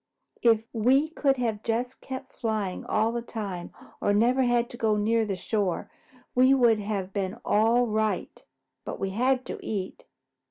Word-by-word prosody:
If 225 -2 +4
we 260 +7 +3
could 275 -4 +1
have 225 -4 -1
just 240 +3 -2
kept 260 -1 -7
flying 215 -5 -2
all 220 +1 +2
the 235 0 -2
time 200 -7 -6 0.3
or 205 - +2
never 245 +5 +3
had 240 -1 +2
to - - -8
go 220 -2 +2
near 225 +2 +2
the 195 - -1
shore, 195 -1 -2 0.4
we 255 +2 +5
would 235 -4 +4
have 200 -2 -3
been 195 0 -2
all 230 +4 +3
right. 215 -1 -2 0.4
But - - -6
we 195 0 -2
had 255 +5 +1
to - - -6
eat." 195 -3 -4
225 Hz, 165 wpm, -27 LUFS, 205-245 Hz, 0.4 s, we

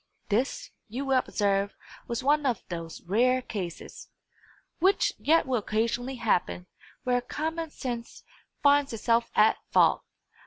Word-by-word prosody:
This, 260 - -1 0.2
you 250 +6 -4
will 265 -1 +3
observe, 200 -4 0 0.3
was 235 +1 -3
one 295 +2 +3
of 250 -6 0
those 165 -2 -6
rare 245 +8 +3
cases, 190 -9 -7 0.7
which 385 +4 +3
yet 325 +3 +3
will 255 -3 +1
occasionally 230 +5 -1
happen, 205 -6 0 0.4
where 245 -1 +1
common 320 +5 -3
sense 240 -5 -6 0.4
finds 285 -2 +4
itself 230 +1 +1
at 215 - +5
fault. - - +4
245 Hz, 125 wpm, -28 LUFS, 215-275 Hz, 0.7 s, at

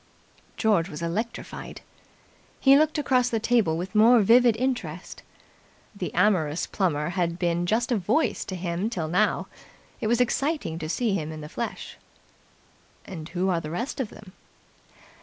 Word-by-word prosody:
George 200 -6 +2
was 150 0 -7
electrified. 215 +8 -5 0.8
He 270 0 +6
looked 310 +2 +3
across 255 -4 +2
the 225 - 0
table 220 -8 +2
with 180 +2 -5
more 225 +2 +6
vivid 235 +2 +5
interest. 225 -10 -3 0.7
The 180 -5 -4
amorous 170 -7 +2
Plummer 160 -5 -1
had 175 -2 -1
been 175 -1 0
just 235 +5 0
a 235 - +3
Voice 210 - 0
to 190 - -5
him 175 +3 -2
till 175 -9 -3
now. 175 +3 +1 0.5
It - - -2
was 235 +2 +2
exciting 260 - 0
to 155 -1 -5
see 225 +3 0
him 160 -5 -2
in 155 -1 -7
the 150 - -7
flesh. 235 +6 -6 1.1
"And 165 -4 -8
who 185 +2 -1
are 170 -2 +1
the 150 - -6
rest 235 - -4
of 250 -6 -2
them?" 200 -3 -14
195 Hz, 160 wpm, -25 LUFS, 170-235 Hz, 1.1 s, He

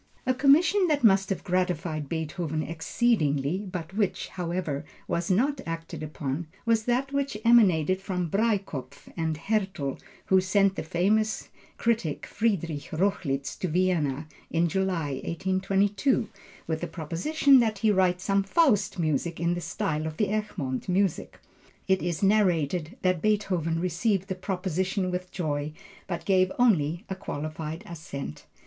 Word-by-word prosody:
A 255 - +3
commission 325 +9 +4
that 295 -4 +1
must 195 -3 +5
have 195 - -2
gratified 175 -5 -1
Beethoven 160 -1 -2
exceedingly, 165 - 0
but 175 0 -5
which, 205 -1 -1
however, 170 -5 -3 0.2
was 170 0 -1
not 260 +9 +2
acted 165 -1 -5
upon, 155 +1 -4 0.2
was 225 -1 +2
that 255 +3 0
which 280 -5 -1
emanated 185 -6 +5
from 180 -3 -2
Breitkopf 195 - -2
and 160 -2 -1
Härtel, 190 -7 -1 0.3
who 190 -1 +4
sent 195 +1 +2
the - - -3
famous 210 +7 0 0.3
critic 225 -10 0
Friederich 170 -9 -1
Rochlitz 155 -6 -1
to 185 - -1
Vienna 160 -5 0 0.2
in 170 +1 +2
July, 165 -7 -1
1822, 195 - +1 0.4
with 160 -1 -2
a - - -1
proposition 180 - +3
that 220 -3 +1
he 215 +2 +3
write 185 -2 +3
some 195 +1 +1
Faust 210 - +2
music 160 0 -1
in 170 +1 +1
the 175 - -3
style 165 -3 -2
of 155 0 -6
the 210 - +1
Egmont 185 -11 -3
music. 190 -1 0 0.5
It 190 -1 +3
is 175 +1 -2
narrated 180 - +2
that 185 -3 +2
Beethoven 185 -6 +1
received 185 +3 0
the - - 0
proposition 185 0 -2
with 180 0 -3
joy, 150 -4 -2 0.3
but 175 -2 -4
gave 185 -1 +3
only 175 -6 +2
a 190 - -3
qualified 155 -1 -5
assent. 150 - -7
185 Hz, 140 wpm, -27 LUFS, 160-205 Hz, 0.5 s, must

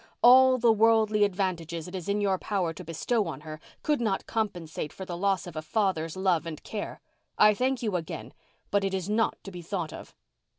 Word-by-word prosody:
All 255 +1 +8
the 235 -1 +4
worldly 220 -1 +4
advantages 180 -4 -2
it 180 - -10
is 185 -1 -5
in 205 +1 +1
your 195 -2 +1
power 185 -6 -1
to 180 - -9
bestow 185 +6 -1
on 150 -3 -6
her 155 0 -8 0.2
could 295 -4 +1
not 210 -4 0
compensate 175 -9 -3
for 190 - -8
the 175 -2 -5
loss 195 +1 0
of 175 -3 -9
a 155 - -3
father's 165 -1 -1
love 185 -4 +1
and 155 -2 -7
care. 210 -2 -5 0.4
I 210 0 +7
thank 255 +3 0
you 210 -4 -1
again—but 190 +3 -4
it 195 -1 0
is 190 +2 -3
not 225 +1 +1
to 195 - -8
be 175 -1 -8
thought 170 -2 -4
of." - - -11
195 Hz, 205 wpm, -28 LUFS, 170-215 Hz, 0.4 s, All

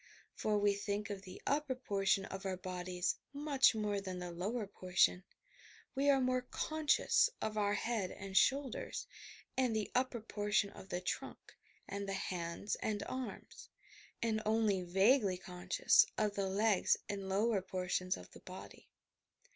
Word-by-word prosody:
For 210 -1 0
we 205 0 +3
think 205 +1 -3
of 200 -1 -5
the 185 -1 -11
upper 285 -2 +1
portion 195 -5 +1
of 195 0 -7
our 190 -2 -2
bodies 180 0 -2 0.2
much 280 -4 +4
more 210 -2 -1
than 185 -2 -5
the 180 -1 -5
lower 205 +7 -2
portion; 185 -1 +2 0.7
we 280 +1 +2
are 275 -1 +5
more 255 0 +2
conscious 310 - +2
of 215 - -2
our 205 -1 +2
head 220 -6 -1
and 195 0 -8
shoulders, 275 - +1 0.5
and 250 -4 +2
the 215 -2 -1
upper 255 -1 +1
portion 210 -1 0
of 190 - -12
the 180 +1 -2
trunk 180 - -5 0.3
and 200 0 -4
the - - -1
hands 180 +1 -3
and 205 -2 -2
arms, 260 -1 -6 0.5
and 220 -1 +1
only 215 -3 +2
vaguely 195 +3 +3
conscious 190 - +3
of 210 -1 +1
the 200 -1 -1
legs 200 0 +3
and 195 -1 -4
lower 205 +1 +2
portions 185 0 -1
of - - -12
the - - -13
body. - - -11
205 Hz, 155 wpm, -36 LUFS, 190-235 Hz, 0.7 s, are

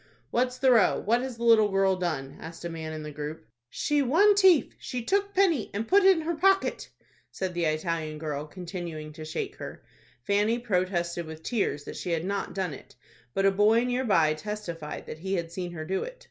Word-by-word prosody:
"What's 250 +1 +1
the 260 0 +4
row? 225 -5 +4
What 235 +4 +1
has 255 -2 -5
the 235 - -6
little 225 -3 +6
girl 195 -1 +2
done?" 160 -7 -3
asked 165 +1 -9
a - - -2
man 160 -1 -5
in 155 -1 -6
the 150 - -6
group. 150 0 -6 0.2
"She 295 -1 0
one 335 +11 +5
tief. 380 -6 +5
She 245 -2 -4
took 400 - +1
penny, 345 - +3
and 220 +2 -2
put 400 +1 +5
in 380 -4 +6
her 330 +2 -1
pocket," 390 +4 +2 0.4
said 185 -2 -4
the 170 -1 0
Italian 155 0 -1
girl, 150 -1 -4
continuing 170 -3 -7
to 155 0 -9
shake 155 - -4
her. - - -8 0.4
Fanny 205 - +2
protested 180 -6 -1
with 160 0 -9
tears 195 - -1
that - - -8
she 180 - -5
had 165 +1 -1
not 200 +1 -3
done 185 -5 -2
it, 135 - -13 0.4
but 195 - +2
a 195 - +6
boy 210 +4 +4
near 250 +1 0
by 165 -9 +3
testified 170 -3 -6
that 155 - -8
he 190 +3 -2
had 170 -2 -3
seen 175 0 -4
her 155 -2 -6
do 190 +3 -1
it. - - -7
190 Hz, 210 wpm, -27 LUFS, 160-245 Hz, 0.4 s, little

